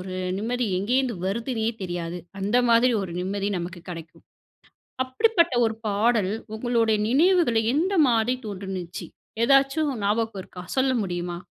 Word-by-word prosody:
ஒரு 185 Hz, 0 st, -6 dB, 0.2 s
நிம்மதி 240 Hz, +2 st, -1 dB
எங்கே 220 Hz, +7 st, 0 dB
இருந்து 250 Hz, -6 st, -1 dB
வருதுன்னே 225 Hz, +3 st, -2 dB, 0.2 s
தெரியாது. 175 Hz, -1 st, -4 dB, 0.2 s
அந்த 205 Hz, +5 st, +1 dB
மாதிரி 235 Hz, +2 st, +5 dB
ஒரு 175 Hz, -3 st, -6 dB
நிம்மதி 195 Hz, +2 st, -2 dB
நமக்கு 175 Hz, 0 st, -7 dB
கிடைக்கும். 165 Hz, -1 st, -10 dB, 0.8 s
அப்படிப்பட்ட 335 Hz, -, +2 dB
ஒரு 220 Hz, -, 0 dB
பாடல் 210 Hz, -1 st, +2 dB, 0.2 s
உங்களுடைய 225 Hz, -1 st, +1 dB
நினைவுகளை 305 Hz, -4 st, +4 dB
எந்த 355 Hz, +7 st, +1 dB, 0.2 s
மாதிரி 230 Hz, +1 st, +2 dB
தோன்றுச்சு? 190 Hz, -3 st, -6 dB, 0.4 s
ஏதாச்சும் 275 Hz, +3 st, +3 dB
ஞாபகம் 215 Hz, 0 st, 0 dB
இருக்கா? 180 Hz, -, -11 dB
சொல்ல 260 Hz, 0 st, +3 dB
முடியுமா? 175 Hz, -2 st, -4 dB
220 Hz, 130 wpm, -25 LUFS, 185-255 Hz, 0.8 s, மாதிரி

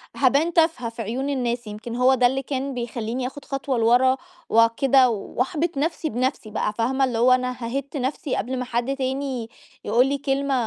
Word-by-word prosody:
هابان 285 Hz, +6 st, +2 dB
تافهة 320 Hz, -8 st, +2 dB
في 230 Hz, 0 st, -7 dB
عيون 245 Hz, +6 st, -3 dB
الناس، 245 Hz, -4 st, -2 dB
يمكن 215 Hz, +3 st, -6 dB
هو 250 Hz, +2 st, +4 dB
ده 250 Hz, -1 st, +4 dB
اللي 265 Hz, +2 st, -1 dB
كان 270 Hz, 0 st, -3 dB
بيخلّيني 240 Hz, 0 st, -3 dB
آخد 280 Hz, +2 st, -10 dB
خطوة 275 Hz, -1 st, -2 dB
لورا 245 Hz, +3 st, +4 dB, 0.3 s
وكده، 245 Hz, +3 st, +4 dB
وأحبط 280 Hz, -, -2 dB
نَفْسي 320 Hz, +2 st, -1 dB
بنَفْسي 250 Hz, -1 st, -2 dB
بقى، 210 Hz, -, -1 dB
فاهمة، 255 Hz, +5 st, 0 dB
اللي 245 Hz, -3 st, -2 dB
هو 245 Hz, +2 st, +4 dB
أنا 255 Hz, 0 st, +2 dB
هاهِدّ 260 Hz, +4 st, -3 dB
نَفْسي 265 Hz, +1 st, -2 dB
قبل 260 Hz, +1 st, -2 dB
ما 250 Hz, -, -3 dB
حد 245 Hz, +2 st, -1 dB
تاني 265 Hz, -3 st, -3 dB, 0.4 s
يقول 240 Hz, +5 st, +3 dB
لي 280 Hz, +1 st, 0 dB
كلمة 275 Hz, 0 st, -1 dB
255 Hz, 180 wpm, -23 LUFS, 235-275 Hz, 0.4 s, هو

